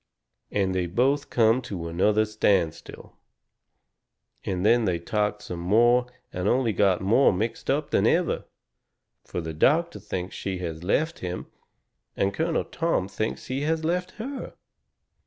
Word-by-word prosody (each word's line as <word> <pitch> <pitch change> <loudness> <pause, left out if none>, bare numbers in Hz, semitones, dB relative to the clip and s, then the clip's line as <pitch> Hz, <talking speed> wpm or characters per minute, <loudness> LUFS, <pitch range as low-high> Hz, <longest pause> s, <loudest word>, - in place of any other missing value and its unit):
And 95 -2 0
they 90 -1 0
both 135 +10 +1
come 115 +1 +3
to 90 -8 -5
another 105 +6 +2
standstill. 100 -6 -1 1.3
And 95 0 -2
then 115 +1 +4
they 90 -3 +1
talked 105 +4 -1
some 90 - -6
more 120 +7 +4 0.3
and 90 +2 -2
only 120 -1 +2
got 95 -1 +2
more 110 +8 +4
mixed 105 +5 -3
up - - 0
than - - +3
ever. - - +1 0.8
Fur 90 - -5
the 80 -1 -5
doctor 150 - +2
thinks 95 -2 -5
she 95 -1 -3
has 85 -2 -5
left 155 - 0
him, 90 0 -4 0.7
and 100 0 +1
Colonel 160 0 0
Tom 165 - -1
thinks 110 +3 -3
he 130 +2 -3
has 160 +2 0
left 180 +2 -1
her. 265 +5 -6
105 Hz, 145 wpm, -26 LUFS, 90-130 Hz, 1.3 s, then